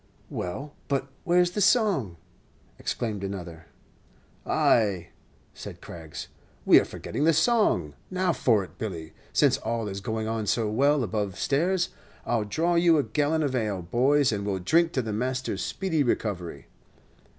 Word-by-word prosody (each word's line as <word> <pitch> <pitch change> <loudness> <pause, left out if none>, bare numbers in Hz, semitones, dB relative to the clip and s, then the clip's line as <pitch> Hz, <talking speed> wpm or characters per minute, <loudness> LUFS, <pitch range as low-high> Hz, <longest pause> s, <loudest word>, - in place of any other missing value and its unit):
"Well, 135 +12 -5
but 140 -1 -1 0.2
where's 175 0 +3
the 205 - -2
song?" 185 - +2 0.6
exclaimed 105 -5 -3
another. 90 -5 -6 0.8
"Ay," 95 -7 +2 0.4
said - - -9
Craggs, 80 -2 -8 0.4
"we - - +8
are - - -1
forgetting 145 - -4
the 165 +1 +5
song. 205 - +2 0.2
Now 185 -1 +1
for 115 -6 +2
it, 95 - -14
Billy. 85 -7 -5 0.2
Since - - +3
all 115 -1 -2
is 100 0 -5
going 110 +2 -3
on 110 -1 -2
so 110 +1 +1
well 140 +4 +3
above 100 -2 -2
stairs, 175 +6 +1 0.4
I'll 115 -3 0
draw 165 +11 0
you 170 -1 +5
a 145 - +2
gallon 150 +2 0
of 140 -3 -1
ale, 105 -7 -1
boys, 130 +8 +3
and 100 -2 -2
we 100 - -1
'll - - -1
drink 165 - +3
to 130 - 0
the 110 -2 -3
master's 130 +4 -2
speedy 175 -6 -1
recovery." 90 - -2
120 Hz, 155 wpm, -27 LUFS, 100-155 Hz, 0.8 s, we